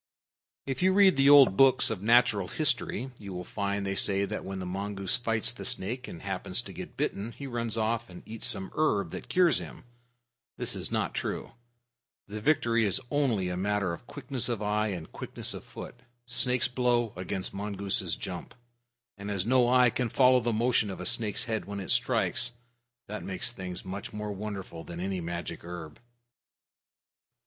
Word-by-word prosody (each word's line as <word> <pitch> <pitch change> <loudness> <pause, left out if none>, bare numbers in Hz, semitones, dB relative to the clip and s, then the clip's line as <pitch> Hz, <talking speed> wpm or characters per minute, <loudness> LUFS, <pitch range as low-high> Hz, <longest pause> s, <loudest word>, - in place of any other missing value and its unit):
If 135 +3 -3
you 185 +1 +4
read 195 -2 +6
the 135 +1 +5
old 140 -8 +8
books 135 -2 +5
of 105 -4 -3
natural 110 -3 +4
history, 130 - -1
you 100 -2 -7
will 90 0 -5
find 100 +1 -2
they 95 - -1
say 100 0 +2
that 105 +2 -5
when 95 0 -5
the 95 - -5
mongoose 100 +4 -2
fights 115 0 0
the - - -8
snake 125 +1 -1
and 85 - -9
happens - - 0
to - - -9
get - - -9
bitten, 105 +4 -2
he 140 - -8
runs 115 -3 -2
off 115 +1 -1
and 90 - -11
eats 110 0 -2
some 95 -2 +1
herb 100 - +1
that - - -7
cures 180 -2 +4
him. - - -9 0.7
That - - -1
is - - -3
not - - -1
true. - - -3 0.8
The 105 +1 -6
victory 115 -4 +2
is 100 0 +3
only 120 -11 +1
a 90 - -2
matter 100 -1 0
of 100 - -10
quickness 130 -3 -2
of 120 -3 -1
eye 105 +1 0
and 90 -6 -5
quickness - - 0
of - - -8
foot 125 - -10 0.3
snake's 125 0 +2
blow 120 -3 +1
against 95 +1 -4
mongoose's 100 -1 -2
jump - - -7 0.6
and 100 +1 -6
as 100 -2 -1
no 125 0 +4
eye 125 -1 +5
can 125 +1 -1
follow 130 +1 +5
the 120 0 -1
motion 115 -1 +2
of 95 - -6
a - - -5
snake's 115 -3 0
head 110 -2 -2
when 100 0 -5
it 95 - -2
strikes, - - +2 0.5
this 105 +1 -5
makes 95 +6 -2
things 90 -5 -7
much 95 +2 -6
more 105 0 -4
wonderful 100 -5 -6
than 85 0 -8
any 95 0 -2
magic 85 -1 -5
herb. 85 -3 -8
105 Hz, 185 wpm, -29 LUFS, 95-125 Hz, 0.8 s, old